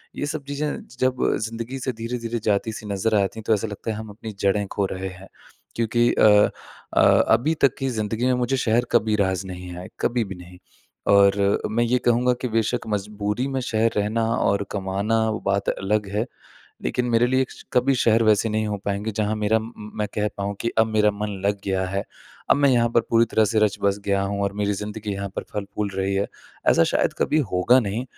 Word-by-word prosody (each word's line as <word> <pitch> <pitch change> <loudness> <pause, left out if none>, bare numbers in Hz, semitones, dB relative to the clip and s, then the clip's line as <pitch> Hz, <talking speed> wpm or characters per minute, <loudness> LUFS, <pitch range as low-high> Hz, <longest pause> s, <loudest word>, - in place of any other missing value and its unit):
ये 145 - -2
सब 150 -1 -4
चीज़ें 145 +1 -2 0.2
ज 125 - -17
जब 130 0 +1 0.3
ज़िंदगी 115 +4 -5
से 130 0 -2
धीरे-धीरे 115 0 -4
जाती 105 +1 +1
सी 110 - -8
नज़र 105 +2 0
आती 100 +3 -2
हैं - - -8
तो 110 - +4
ऐसा 105 +1 0
लगता 105 +2 -5
है 105 - -4
हम 110 -1 -7
अपनी 110 +1 -8
जड़ें 100 +1 +1
खो 100 - 0
रहे 95 0 -4
हैं। 95 +1 -12 0.5
क्योंकि 120 +1 +2
अ, - - +2 0.7
अ, - - +6
अभी 125 +9 +4
तक 135 - +4
की 135 -1 -1
ज़िंदगी 110 +1 -2
में 130 - +3
मुझे 135 +2 0
शहर 120 +1 +2
कभी 110 -2 +3
रास 95 0 -1
नहीं 90 -1 -7
आए, 90 - -7
कभी 120 -1 +1
भी 95 -2 -7
नहीं। 90 0 -13 0.6
और 100 0 +5 0.3
अ, - - +1
मैं 120 +2 +1
ये 125 +2 +2
कहूँगा 125 +1 +3
कि 125 - -1
बेशक़ 115 +1 0
मजबूरी 105 +4 -2
में 135 -1 -2
शहर 115 -1 +1
रहना 110 +2 +1
और 100 0 +1
कमाना 100 +3 0
वो 110 - -2
बात 100 0 +1
अलग 105 +1 -1
है 110 +3 +1 0.6
लेकिन 125 - 0
मेरे 115 +1 +4
लिए 130 +1 +2
श - - -12
कभी 130 +2 +3
शहर 115 -1 +3
वैसे 110 +1 +3
नहीं 110 0 0
हो 105 - -1
पाएँगे 100 +2 -1
जहाँ 105 +1 0
मेरा 105 +1 +2
म - - -7
म 105 0 -8
मैं 105 - 0
कह 105 0 0
पाऊँ 100 0 -3
कि 115 - -1
अब 110 - +5
मेरा 105 -1 +3
मन 105 +1 -4 0.2
लग 100 0 +1
गया 95 -1 0
है, 100 +1 -2 0.5
अब - - +6
मैं 140 -1 +4
यहाँ 120 -1 +3
पर 115 - +6
पूरी 115 0 +5
तरह 110 0 +2
से 110 +1 +1
रचबस 100 -1 +1
गया 100 -1 +1
हूँ 100 0 -2
और 100 0 0
मेरी 105 0 0
ज़िंदगी 105 +1 -5
यहाँ 100 0 -4
पर - - -2
फल-फूल 100 0 -3
रही 95 0 0
है। 100 +1 +1 0.4
ऐसा 85 - +5
शायद - - +1
कभी 155 - +2
होगा 115 +8 +4
नहीं 110 +3 -3
110 Hz, 220 wpm, -23 LUFS, 100-115 Hz, 0.7 s, अ